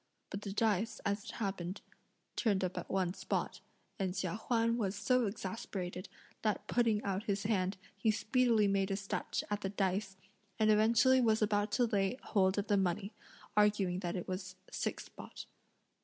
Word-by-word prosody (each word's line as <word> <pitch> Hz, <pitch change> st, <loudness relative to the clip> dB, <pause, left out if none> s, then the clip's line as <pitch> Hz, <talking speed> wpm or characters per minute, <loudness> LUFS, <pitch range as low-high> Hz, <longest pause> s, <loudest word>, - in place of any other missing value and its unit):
But 200 Hz, -, -4 dB
the 200 Hz, -, -5 dB
dice, 215 Hz, +1 st, +1 dB
as 200 Hz, +1 st, -1 dB
it -, -, -6 dB
happened, 190 Hz, -3 st, -3 dB, 0.5 s
turned 200 Hz, -5 st, +1 dB
up 185 Hz, 0 st, -1 dB
at -, -, -5 dB
one 185 Hz, -2 st, +1 dB
spot, -, -, -2 dB, 0.4 s
and 190 Hz, -2 st, -1 dB
Chia 185 Hz, -3 st, -1 dB
Huan 230 Hz, +1 st, +1 dB
was 200 Hz, -2 st, 0 dB
so 250 Hz, +3 st, +2 dB
exasperated 190 Hz, -3 st, -5 dB, 0.3 s
that 215 Hz, -2 st, 0 dB
putting 225 Hz, -3 st, +2 dB
out 200 Hz, +2 st, -2 dB
his 200 Hz, -2 st, 0 dB
hand, 195 Hz, -3 st, 0 dB, 0.2 s
he 200 Hz, +3 st, +1 dB
speedily 215 Hz, +1 st, +3 dB
made 195 Hz, 0 st, +1 dB
a 195 Hz, -, 0 dB
snatch 195 Hz, -1 st, -2 dB
at 205 Hz, 0 st, 0 dB
the 195 Hz, -, -1 dB
dice, 190 Hz, 0 st, -1 dB, 0.4 s
and 215 Hz, -1 st, +4 dB
eventually 230 Hz, +5 st, +5 dB
was 220 Hz, -2 st, +3 dB
about 205 Hz, 0 st, +1 dB
to 245 Hz, +2 st, +4 dB
lay 205 Hz, 0 st, +1 dB
hold 190 Hz, -2 st, +2 dB
of 205 Hz, -, +1 dB
the 205 Hz, -2 st, +2 dB
money, 190 Hz, +2 st, 0 dB, 0.4 s
arguing 205 Hz, -4 st, +3 dB
that 175 Hz, -2 st, -3 dB
it 180 Hz, -, -4 dB
was 185 Hz, 0 st, -4 dB, 0.2 s
six -, -, -3 dB
spot. -, -, -10 dB
205 Hz, 170 wpm, -34 LUFS, 190-220 Hz, 0.5 s, eventually